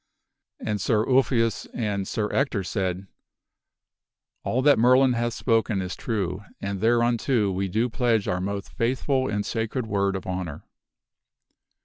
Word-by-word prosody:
And 105 -2 -2
Sir 110 +1 +2
Ulfius 120 -4 +2
and 100 -4 -2
Sir 105 -3 -1
Ector 130 -8 +1
said, 95 -1 -2 1.4
"All 130 +2 0
that 145 -3 +5
Merlin 130 +2 +5
hath 120 0 -1
spoken 115 -3 +1
is 90 0 -4
true, 100 -4 -3 0.2
and 100 -1 -4
thereunto 120 -1 +2
we 95 +1 -1
do 110 +6 +1
pledge 115 -3 +1
our 90 0 -1
most 100 +1 -4
faithful 130 +2 0
and 105 -1 -1
sacred 115 +2 -2
word 100 -2 0
of 95 - -5
honor." 90 -5 -5
110 Hz, 135 wpm, -25 LUFS, 100-120 Hz, 1.4 s, that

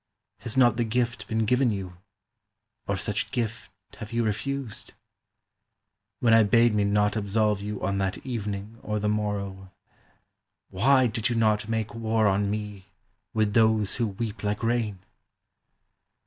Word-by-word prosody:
Has 120 +2 -5
not 120 -3 +5
the 120 - +2
gift 120 +1 -1
been 110 0 0
given 125 +3 +3
you, 95 -4 -4 0.9
or 100 - 0
such 105 +3 -1
gift 115 -5 -3 0.3
have 110 -1 -8
you 115 0 0
refused? 115 +2 -4 1.3
When 115 -2 +4
I 115 - +7
bade 115 +2 +4
me 105 -1 +2
not 105 +1 +2
absolve 105 0 +1
you 105 0 -4
on 100 +1 0
that 95 0 -1
evening 105 -2 -5
or 105 0 -2
the 105 0 -1
morrow, 100 -2 -2 1.0
Why 130 +7 +4
did 115 0 0
you 120 - -1
not 110 -1 +1
make 110 -1 -2
war 110 -1 0
on 100 0 +2
me 105 -2 -5 0.5
with 110 -2 +1
those 110 -3 +3
who 120 -2 +1
weep 105 +1 -5
like 105 +2 -2
rain? 115 -5 -1
110 Hz, 150 wpm, -26 LUFS, 105-115 Hz, 1.3 s, I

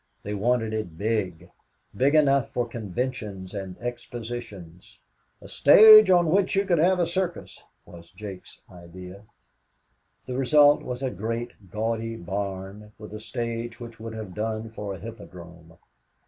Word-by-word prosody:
They 105 - -4
wanted 110 +1 0
it 105 -7 -4
big 95 -5 -2 0.4
big 140 +4 +2
enough 140 -4 +3
for 120 -1 -2
conventions 105 -3 -5
and 95 -3 -6
expositions 115 -7 -8 0.4
"a - - -13
stage 215 +6 +8
on 175 -3 +4
which 195 +1 +2
you 195 +1 +2
could 175 -4 +2
have 180 +3 +3
a 175 - +3
circus," 175 0 -4 0.2
was 85 -1 -14
Jake's 100 -3 -10
idea. 90 +3 -12 1.0
The 125 - -5
result 145 +2 +5
was 125 +1 -6
a 130 - -1
great, 115 0 -5
gaudy 115 +3 -3
barn 100 +2 -6
with 105 -1 -11
a 105 - -6
stage 115 +1 -5
which 120 -1 -10
would 110 0 -7
have 110 -4 -7
done 110 +1 -4
for 105 -3 -6
a - - -11
hippodrome. 85 -7 -12
110 Hz, 145 wpm, -25 LUFS, 95-125 Hz, 1.0 s, stage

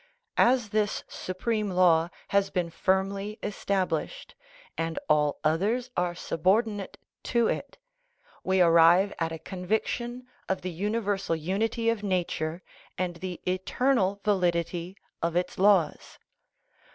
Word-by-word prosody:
As 240 -3 +4
this 210 -1 0
supreme 210 +3 -2
law 175 -3 +4 0.2
has 200 0 +2
been 175 -3 -2
firm 190 +3 +1
ly 200 +2 -5
established, 200 - -2 0.4
and 165 0 -3
all 150 -1 +2
others 210 +11 +1
are 175 0 0
subordinate 200 +5 0 0.3
to 235 -1 +2
it, - - -3 0.7
we 190 0 +2
arrive 170 +4 +5
at 165 -1 -1
a 165 - -4
conviction 220 +8 -3 0.2
of 190 - 0
the 185 - -4
universal 200 0 -1
unity 210 +8 -1
of 230 -2 +1
nature 175 -3 -2 0.3
and 175 -1 -2
the 180 0 -6
eternal 200 +2 +1
validity 175 -2 0 0.2
of 170 0 -1
its 180 +1 -1
laws. 190 -6 +2
190 Hz, 120 wpm, -27 LUFS, 175-210 Hz, 0.7 s, arrive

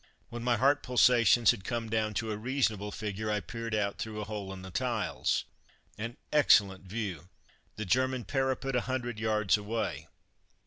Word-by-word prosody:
When 120 0 -6
my 120 -1 +2
heart 140 +5 +3
pulsations 120 -3 +5
had 95 - -6
come 115 +1 -3
down 110 -1 -1
to 110 +2 -1
a - - -2
reasonable 110 -3 -1
figure 105 0 -4
I 105 0 +1
peered 115 +1 -5
out 100 -1 -1
through 110 -1 -4
the 105 - -3
hole 105 -2 -5
in 95 -1 -8
the 95 - -9
tiles. 120 -1 -1 0.5
An 115 +2 -6 0.2
excellent 100 -10 +4
view! 95 -5 -5 0.5
The 110 - -4
German 130 +3 +1
parapet 135 -1 -1
a 125 - +2
hundred 120 -3 -3
yards 110 -3 +2
away! 110 +2 -3
110 Hz, 170 wpm, -30 LUFS, 105-125 Hz, 0.5 s, pulsations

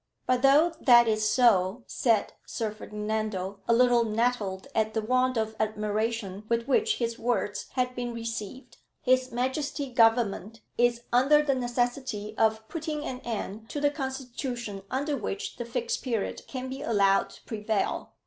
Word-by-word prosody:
"But 255 -1 +2
though 295 +5 +5
that 240 -2 +7
is 215 -1 +2
so," 215 -2 +3
said 225 -4 +1
Sir 220 -2 -2
Ferdinando, 210 -2 -4
a 235 - +4
little 245 -1 +5
nettled 215 -4 -1
at 220 0 0
the 220 - +1
want 255 +2 +2
of 220 0 -1
admiration 215 -1 -2
with 235 +1 0
which 435 - +2
his 230 -1 -3
words 215 -3 -1
had 250 -1 0
been 245 -1 -3
received, 230 +1 -6 0.3
"H.M. 255 +2 0
Government 225 -2 +2
is 240 0 +2
under 280 +5 +5
the 285 -2 +2
necessity 245 -3 -2
of 220 0 +1
putting 310 -1 -4
an 255 - -4
end 220 -2 -5
to 290 - -3
the 290 0 +2
constitution 255 -6 -5
under 285 +3 -1
which 200 -5 -4
the 240 - -4
Fixed 470 - -2
Period 230 -6 -3
can 260 -1 -5
be 265 +1 -6
allowed 200 -7 +3
to - - -16
prevail. 215 -2 -2
235 Hz, 150 wpm, -28 LUFS, 215-255 Hz, 0.3 s, that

